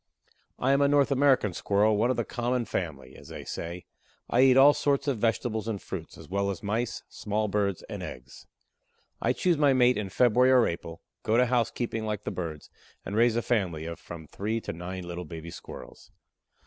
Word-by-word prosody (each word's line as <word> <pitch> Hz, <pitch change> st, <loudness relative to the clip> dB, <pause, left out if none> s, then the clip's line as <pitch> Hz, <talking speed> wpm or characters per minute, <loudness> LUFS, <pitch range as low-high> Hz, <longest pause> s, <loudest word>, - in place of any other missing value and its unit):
I 130 Hz, -, +1 dB
am 140 Hz, +1 st, +3 dB
a 140 Hz, -, +5 dB
North 140 Hz, 0 st, +3 dB
American 135 Hz, -7 st, +3 dB
Squirrel, 105 Hz, +4 st, +2 dB
one 115 Hz, +4 st, +2 dB
of 130 Hz, -, 0 dB
the 120 Hz, -, 0 dB
"common" 120 Hz, 0 st, -1 dB
family, 70 Hz, -11 st, -4 dB
as -, -, -13 dB
they -, -, -8 dB
say. 85 Hz, +2 st, -6 dB, 0.5 s
I 125 Hz, -, +4 dB
eat 130 Hz, -1 st, +6 dB
all 140 Hz, +2 st, +8 dB
sorts 140 Hz, -1 st, 0 dB
of 135 Hz, -6 st, 0 dB
vegetables 110 Hz, 0 st, 0 dB
and 110 Hz, -3 st, -2 dB
fruits, -, -, -7 dB
as -, -, -12 dB
well 100 Hz, +1 st, -1 dB
as 95 Hz, -, -5 dB
Mice, 110 Hz, +4 st, -2 dB
small 105 Hz, +1 st, -2 dB
Birds 100 Hz, -2 st, -1 dB
and -, -, -7 dB
eggs. 65 Hz, +1 st, -9 dB, 0.7 s
I -, -, +2 dB
choose 175 Hz, -4 st, +1 dB
my 145 Hz, -2 st, +5 dB
mate 125 Hz, -2 st, +4 dB
in 100 Hz, -2 st, -4 dB
February 125 Hz, +4 st, +4 dB
or 125 Hz, -3 st, +6 dB
April, 85 Hz, -1 st, -5 dB, 0.2 s
go 110 Hz, +1 st, +1 dB
to 125 Hz, -, +5 dB
housekeeping 120 Hz, -2 st, -1 dB
like 105 Hz, -1 st, -3 dB
the -, -, -3 dB
birds, 80 Hz, -4 st, -6 dB, 0.3 s
and 100 Hz, -, -4 dB
raise 115 Hz, +1 st, +4 dB
a 120 Hz, -, 0 dB
family 90 Hz, -10 st, -1 dB
of 85 Hz, 0 st, -6 dB
from 80 Hz, -2 st, -9 dB
three 105 Hz, +9 st, -3 dB
to -, -, -5 dB
nine 90 Hz, +2 st, -6 dB
little 85 Hz, 0 st, -5 dB
baby 80 Hz, +1 st, -8 dB
Squirrels. -, -, -11 dB
110 Hz, 200 wpm, -28 LUFS, 90-125 Hz, 0.7 s, all